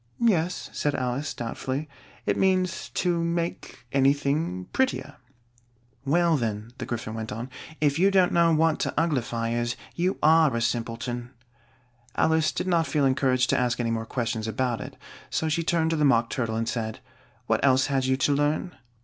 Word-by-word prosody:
"Yes," 180 -7 +1
said 145 -1 0
Alice, 130 +3 -2
doubtfully; 130 +5 -4 0.4
"it - - +1
means 185 -2 +1
to 175 -2 +1
make 170 -6 -3
anything 140 - +1
prettier." 155 - -1 0.9
"Well 165 +2 +3
then," 110 -2 -3
the - - -5
Gryphon 115 -2 -4
went 110 -1 -5
on, 115 +5 -5 0.3
"if 145 0 +2
you 195 +2 +5
don't 190 -2 +4
know 170 -1 +4
what 160 0 +2
to - - 0
uglify 120 -8 0
is, 120 0 -1 0.2
you 180 +3 0
are 155 -4 +5
a - - +1
simpleton." 120 +1 -2 0.9
Alice 160 -1 +2
did - - -3
not 170 -4 +2
feel 140 +1 +1
encouraged 130 -1 +2
to - - +2
ask 125 -1 0
any 115 -1 0
more 115 0 -2
questions 115 -3 -2
about 120 +1 -1
it, - - -9 0.3
so 160 - -1
she 155 +2 +1
turned 165 -1 +1
to - - +1
the 150 - +1
Mock 120 -5 +3
Turtle 115 -4 -1
and 115 0 -1
said, 110 -2 -3 0.5
"What - - 0
else 130 -1 +4
had 135 -2 0
you 130 0 +2
to 140 +2 +2
learn?" 145 +5 0
140 Hz, 175 wpm, -26 LUFS, 120-165 Hz, 0.9 s, you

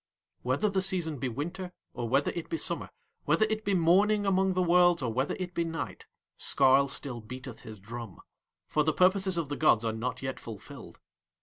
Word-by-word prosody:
Whether 130 +12 +1
the 195 -2 +1
season 175 -6 0
be 130 - -1
winter 175 +9 -5 0.2
or 120 -1 -4
whether 135 +3 +2
it 170 - -6
be 330 - -1
summer, - - -3 0.4
whether 215 - +3
it 220 0 -2
be 200 -2 +1
morning 200 +5 +4
among 190 -1 +2
the 185 - +2
worlds 175 -2 +4
or 115 -3 -1
whether 130 +4 0
it 180 -1 -5
be 170 - 0
night, 165 -1 -5 0.3
Skarl 135 0 +4
still 135 -3 -4
beateth 125 +2 -9
his 110 -2 -10
drum, 115 -1 -8 0.5
for 150 +10 +1
the 155 +1 +1
purposes 190 +1 +3
of 160 -4 -2
the 145 - -2
gods 120 -7 +4
are 110 - 0
not 125 +4 -4
yet 130 0 -4
fulfilled. 110 -4 -10
155 Hz, 195 wpm, -29 LUFS, 125-185 Hz, 0.5 s, morning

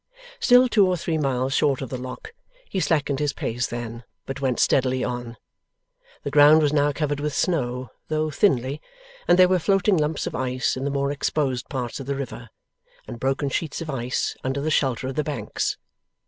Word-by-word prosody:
Still 250 0 +6
two 210 -5 +4
or 180 -1 +1
three 160 -1 -2
miles 135 -2 0
short 140 -2 +2
of 135 - -5
the 130 - -4
Lock, 130 - -8 0.3
he 190 - -2
slackened 145 -4 +1
his 145 -1 0
pace 120 +1 -2
then, 120 0 -6 0.2
but 135 +1 -6
went 130 -3 0
steadily 130 -1 +2
on. 120 -1 -4 0.9
The 140 - -3
ground 150 +2 +7
was 145 0 +2
now 145 0 +3
covered 145 -1 -2
with 150 0 -2
snow, 125 - -1 0.2
though 155 0 -1
thinly, 140 - +1 0.5
and 175 - +5
there 185 0 +7
were 185 0 +2
floating 195 +2 +2
lumps 150 0 -1
of - - -4
ice 130 0 -1
in 130 +1 -4
the - - 0
more 140 0 0
exposed 140 -3 -1
parts 125 -3 -4
of 135 - -7
the 140 - -1
river, 120 -3 -6 0.6
and 120 - -7
broken 135 +2 0
sheets 150 +2 -2
of 165 -2 -4
ice 125 -1 -2
under 135 +2 -1
the 155 +3 -1
shelter 130 -3 +1
of 135 - -3
the 150 - -1
banks. 150 -2 -3
140 Hz, 195 wpm, -24 LUFS, 130-155 Hz, 0.9 s, ground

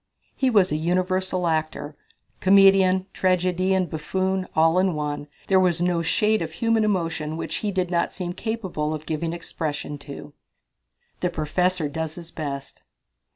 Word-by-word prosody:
He 265 - +2
was 200 -8 +4
a 150 - +1
universal 185 +2 0
actor 155 -2 -2 0.4
comedian, 190 -1 +5
tragedian, 185 0 +1
buffoon 185 +4 -2
all 165 +3 +4
in 185 -3 +2
one. 145 -1 -3 0.2
There 190 -1 +4
was 180 -2 +3
no 175 -1 +1
shade 210 +6 +2
of 160 -1 -4
human 225 +3 +2
emotion 165 -6 -1
which - - -3
he 210 - -2
did 185 -2 -1
not 170 -1 +1
seem 180 -1 -4
capable 185 -9 -3
of 155 0 -8
giving 160 +1 -2
expression 150 -3 -4
to. 140 +1 -10 0.9
The 180 - 0
Professor 175 +1 0
Does 160 +1 -4
His 170 -1 -9
Best. 140 -3 -6
175 Hz, 150 wpm, -24 LUFS, 155-190 Hz, 0.9 s, comedian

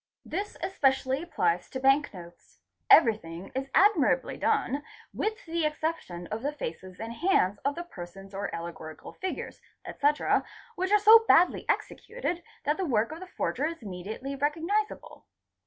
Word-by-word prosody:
'This 400 +5 -4
especially 270 -5 +1
applies 180 - 0
to 260 - -5
bank 270 +2 +3
notes; 175 -2 -13 0.3
everything 195 - +4
is 270 +1 -3
admirably 395 -7 +4
done 280 +4 0 0.3
with 435 0 -3
the 335 0 -1
exception 300 - -2
of 215 +1 -3
the 285 +3 -1
faces 185 - -7
and 225 +1 -5
hands 225 - +2
of 280 +1 -1
the 345 - -4
persons 195 - -10
or 200 +1 -3
allegorical 165 -2 -7
figures, 375 - -5 0.2
etc., 290 +1 +1 0.3
which 375 +2 -2
are 420 - +7
so 440 +2 +8
badly 350 +2 +4
executed 450 -8 -2 0.2
that 295 +2 +1
the 385 - -1
work 230 -4 +1
of 320 - -7
the 370 - -9
forger 310 -4 -1
is 330 -6 -7
immediately 215 +8 -6
recognisable. 330 +10 -2
280 Hz, 150 wpm, -28 LUFS, -, 0.3 s, so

